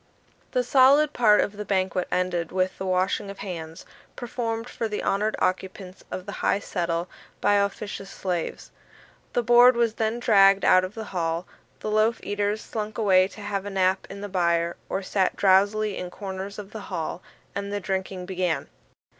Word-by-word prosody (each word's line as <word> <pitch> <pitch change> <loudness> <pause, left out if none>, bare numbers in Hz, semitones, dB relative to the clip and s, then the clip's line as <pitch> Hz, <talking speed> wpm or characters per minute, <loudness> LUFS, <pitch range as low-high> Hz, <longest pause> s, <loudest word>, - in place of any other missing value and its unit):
The 250 -1 +2
solid 280 +4 +5
part 210 -3 +5
of 205 - -3
the 210 - -4
banquet 190 -2 0
ended 180 -2 -1
with 185 0 -1
the 190 - -3
washing 185 +2 0
of 200 - -8
hands, 165 -3 -7 0.3
performed 230 -1 -3
for 230 - -3
the 210 -1 -4
honoured 210 +2 0
occupants 185 0 -3
of 185 - -6
the 200 - -6
high - - +2
settle 170 -3 -2 0.3
by 205 - +3
officious 200 0 -2
slaves. 180 -4 -4 0.6
The 245 - +1
board 240 +2 +7
was 235 -2 +2
then 220 +1 -1
dragged 195 -4 +5
out 185 - +6
of 185 +3 -5
the 225 - -5
hall; 165 0 -1 0.4
the 215 - -3
loaf 215 +2 +2
eaters 205 +1 -1
slunk 215 -1 -5
away 190 -4 +4
to 205 +2 -12
have 205 -1 -3
a 205 - -5
nap 190 -1 +1
in 200 0 -8
the 205 - -4
byre, 170 -3 +1
or 195 - -2
sat 190 0 0
drowsily 205 +2 +3
in 180 - -5
corners 195 +1 -6
of 205 -1 -8
the 220 - -7
hall; 170 -1 -4 0.3
and 200 +1 -4
the 205 - -1
drinking 190 -1 -3
began. 180 -3 -2
195 Hz, 180 wpm, -25 LUFS, 185-215 Hz, 0.6 s, board